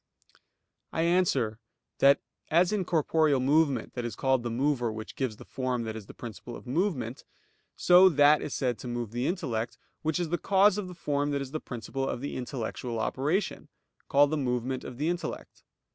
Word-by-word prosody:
I 160 - 0
answer 155 -11 +2 0.4
that, 140 +1 +6 0.3
As 175 +4 +4
in 205 -3 0
corporeal 155 -3 +2
movement 140 -2 +2
that 120 - -4
is 120 -3 -4
called 130 -2 +2
the 120 - -3
mover 125 -1 0
which 110 0 -7
gives 130 -5 -2
the - - -12
form 125 -2 -2
that 110 -1 -4
is 105 -3 -8
the - - -12
principle 120 0 -8
of - - -11
movement, 135 - -1 0.5
so 180 +1 +7
that 150 -1 +5
is 145 - -4
said 125 -3 -1
to - - -7
move 120 -3 -3
the 120 +3 -1
intellect, 120 - -2 0.2
which 160 +2 0
is 175 -2 -1
the 175 +1 -1
cause 200 +1 +4
of 195 - -4
the 180 - -9
form 145 -3 -1
that 140 -1 -1
is 135 - -9
the 155 - -3
principle 135 +2 -4
of - - -3
the 140 - -5
intellectual 125 -2 -4
operation, 145 - -1 0.4
called 145 +1 +5
the 155 - +1
movement 125 -1 -1
of 125 - -8
the 150 +4 -1
intellect. 175 0 -4
135 Hz, 190 wpm, -28 LUFS, 120-160 Hz, 0.5 s, so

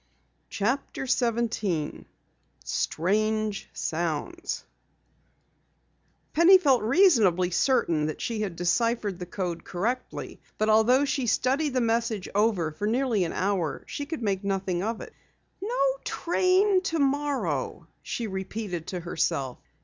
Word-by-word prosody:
CHAPTER 255 +6 -2
17 230 - -1 0.6
STRANGE 210 - 0
SOUNDS 175 - -3 1.7
Penny 340 +4 +8
felt 275 -9 +3
reasonably 215 - +4
certain 170 - +2
that 155 - -4
she 225 -2 -2
had 195 -5 -3
deciphered 205 +2 0
the 180 - -6
code 175 -2 -4
correctly, 235 +8 -4 0.2
but 215 0 +1
although 245 +6 +5
she 270 -3 -1
studied 265 +7 +2
over 280 - -4
the 255 - +3
message 230 -4 0
for 205 -4 +1
nearly 230 -4 +1
an 165 - -4
hour, 185 -5 -1
she 285 - -5
could 310 -6 -4
make 195 -2 0
nothing 195 -3 -1
of 225 +3 -2
it. - - -10 0.5
"No 460 +5 -3 0.3
train 370 +3 +2
tomorrow," 280 - -1 0.2
she 235 - -4
repeated 190 -3 -4
to 180 -2 -4
herself. 140 -6 -1
215 Hz, 120 wpm, -27 LUFS, 180-265 Hz, 1.7 s, Penny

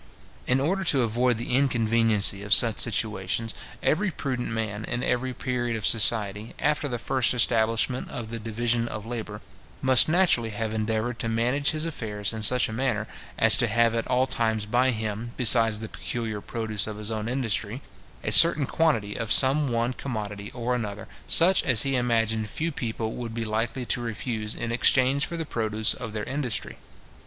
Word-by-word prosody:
In 125 +1 +2
order 185 +8 -1
to 135 -6 +3
avoid 120 +1 0
the 120 +2 -2
inconveniency 115 -6 +3
of 105 0 +4
such 115 -3 +6
situations, 110 0 -1 0.3
every 190 +6 0
prudent 130 -6 -4
man 110 -2 -4
in 120 +2 -4
every 130 +1 -2
period 120 -2 -3
of 110 - -5
society, 105 -1 +2
after 150 0 -1
the 125 -3 -4
first 130 +1 0
establishment 115 +1 0
of 115 -2 -7
the 115 0 -5
division 115 +2 -2
of 110 -2 -7
labour, 115 -1 -7 0.4
must 130 +2 +5
naturally 155 -10 +2
have 110 0 -4
endeavoured 110 +2 -3
to 115 - -3
manage 125 +6 0
his 155 0 -2
affairs 110 -10 -4
in 110 - -6
such 125 +4 +4
a 110 - -8
manner, 115 -3 -2 0.3
as 115 -1 +8
to 125 -2 +2
have 115 +1 +1
at 115 0 -3
all 130 +1 +1
times 110 -4 0
by 125 +4 +1
him, 110 0 -4
besides 115 -3 +5
the 110 - -6
peculiar 110 -2 -6
produce 110 -2 -4
of 105 -1 -7
his 105 +1 -5
own 110 0 -4
industry, 120 -1 -3 0.4
a - - -2
certain 165 -4 +8
quantity 125 -11 -1
of 115 -1 -4
some 140 +2 +4
one 120 0 -2
commodity 105 -6 -6
or 125 0 -3
other, 105 0 -8 0.2
such 185 +3 +5
as 125 -4 +3
he 135 -1 -1
imagined 110 -3 -1
few 165 +9 -3
people 115 -5 -5
would 115 -2 -7
be 115 -1 -4
likely 115 +3 -3
to 120 - -2
refuse 110 -1 -4
in 115 - -5
exchange 130 +3 +2
for 170 - -6
the 165 - -4
produce 110 -4 -1
of 115 -3 -8
their 105 -1 -4
industry. 135 -4 -4
115 Hz, 180 wpm, -25 LUFS, 110-125 Hz, 0.4 s, as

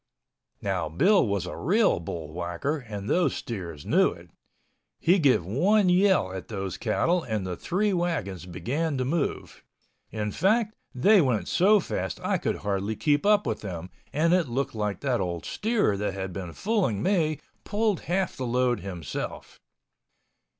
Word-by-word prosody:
Now 95 -5 -1
Bill 185 - +4
was 100 -3 -1
a 90 - -6
real 205 - +2
bullwhacker 85 - -3
and 100 -1 -6
those 170 -2 +2
steers 85 -10 -6
knew - - +4
it. - - -12 0.7
He 180 +4 +4
give 135 - +3
one 185 - +3
yell 180 - +3
at 95 - -6
those 95 -4 -4
cattle 170 +10 +1
and 110 -8 -3
the 90 -1 -3
three 200 - 0
wagons 145 - -2
began 135 - -2
to 130 - -1
move; 150 +2 -2 0.5
in 105 -1 -3
fact 215 - +2 0.2
they 195 +10 +5
went 125 -8 0
so 205 +4 +4
fast 95 - -3
I - - +1
could - - -1
hardly 100 +2 -1
keep 145 - +1
up 210 -1 +4
with 110 -2 -2
them 90 -3 -6 0.2
and 160 +5 +2
it 180 -5 +3
looked 130 +3 -2
like 105 -2 -2
that 130 -6 0
old 85 -2 -3
steer 215 - +1
that 100 -1 -2
had 95 -1 -4
been 90 -2 -6
fooling 190 - 0
me 160 -6 +1 0.2
pulled 210 -3 0
half 185 0 0
the 130 - -4
load 125 0 +1
himself. 90 -7 -6
125 Hz, 160 wpm, -27 LUFS, -, 0.7 s, they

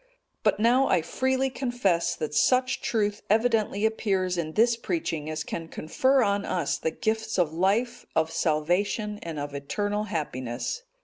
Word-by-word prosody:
But - - +2
now 245 +5 +4
I 175 -4 +2
freely 260 +6 0
confess, 240 -10 0
that 155 -1 -4
such 255 +9 +2
truth 210 -3 0
evidently 220 -1 +2
appears 195 -5 0
in 160 -2 -3
this 230 +4 +4
preaching 230 - -3
as 155 0 -3
can 165 -1 -5
confer 260 - +2
on 200 -1 +1
us 170 -6 -1
the - - 0
gifts 220 +3 -2
of 170 -4 +2
life, 220 +8 0
of 160 0 +2
salvation, 185 +8 0
and 165 -2 -6
of 145 0 -4
eternal 205 +9 -2
happiness. 130 - -3
205 Hz, 150 wpm, -27 LUFS, 160-235 Hz, -, now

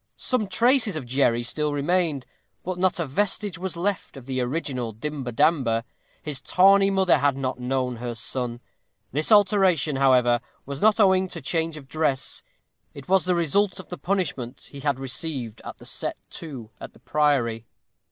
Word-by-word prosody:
Some 250 -5 0
traces 230 - +3
of 155 - -4
Jerry 120 -2 +2
still 150 +4 -1
remained, 150 -1 0 0.4
but 180 0 -4
not 185 -1 +2
a 170 - 0
vestige 195 +4 -1
was 185 -2 -3
left 185 -4 -2
of 130 - -11
the 130 -1 -2
original 125 -3 -3
Dimber 135 +2 -5
Damber. 130 -4 +2 0.4
His 150 -3 -4
tawny 195 +1 +5
mother 190 -5 +3
had 140 -1 +2
not 130 -2 -3
known 125 -1 -1
her 120 0 -5
son. 120 +1 -3 0.5
This 150 - +1
alteration, 190 -8 +4
however, 125 -3 +4 0.2
was 140 0 -6
not 220 +1 +4
owing 190 -2 +4
to - - -7
change 165 -1 -1
of 140 -3 -11
dress; 145 -3 -1 0.5
it 140 -1 -10
was 190 0 +3
the 180 -1 +2
result 185 +4 +1
of 185 - -11
the 180 - -6
punishment 150 -10 -3
he 140 - -9
had 140 -1 -1
received 130 -4 -3
at - - -8
the - - -14
"set - - -3
to" 130 -9 -8
at - - -8
the - - -19
priory. 125 -7 +1
150 Hz, 170 wpm, -25 LUFS, 130-185 Hz, 0.5 s, tawny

